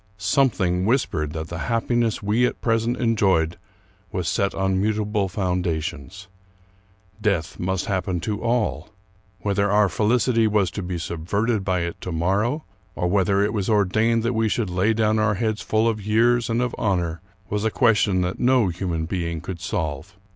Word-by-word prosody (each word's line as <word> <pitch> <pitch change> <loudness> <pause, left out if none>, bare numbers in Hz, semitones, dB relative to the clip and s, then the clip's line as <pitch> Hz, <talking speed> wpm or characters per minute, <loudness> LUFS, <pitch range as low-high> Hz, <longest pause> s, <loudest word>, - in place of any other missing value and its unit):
Something 95 -5 +1
whispered 100 - 0
that 80 0 -5
the 85 - -5
happiness 115 -1 0
we 110 +5 +2
at - - -5
present 115 +1 0
en 115 -2 +2
joyed 85 -5 +2 0.5
was - - -2
set 100 -1 0
on 95 -1 +1
mutable 105 -1 0
foundations. 90 -1 -3 0.9
Death 100 -7 -1
must 95 0 -1
hap 95 -2 -1
pen 90 -2 -1
to 105 +4 -3
all. 120 -2 -1 0.5
Whether 100 0 +1
our 105 0 +4
felicity 115 +4 +2
was 105 -4 +1
to 100 - -5
be 90 -1 -4
subverted 100 +7 -1
by 95 -2 0
it 85 0 -4
to 90 - -5
morrow, 100 - 0 0.3
or 90 - -1
whether 100 +1 +2
it 105 - 0
was 100 -2 -1
ordained 110 +3 +2
that 120 +1 0
we 110 -1 +1
should 105 -4 -1
lay 95 +5 +2
down 110 0 +2
our 110 -1 +2
heads 110 +1 -1
full 110 +1 +1
of 110 -3 -1
years 115 +3 +2
and 115 +2 +1
of 125 - -2
honor, 85 -5 -1 0.3
was 105 0 -1
a 110 - +2
ques 115 -2 +3
tion 95 -3 +2
that 90 0 -2
no 125 -5 +3
human 85 -2 -3
being 85 -1 -3
could 90 +1 -7
solve. 80 -2 -3
100 Hz, 175 wpm, -23 LUFS, 90-110 Hz, 0.9 s, our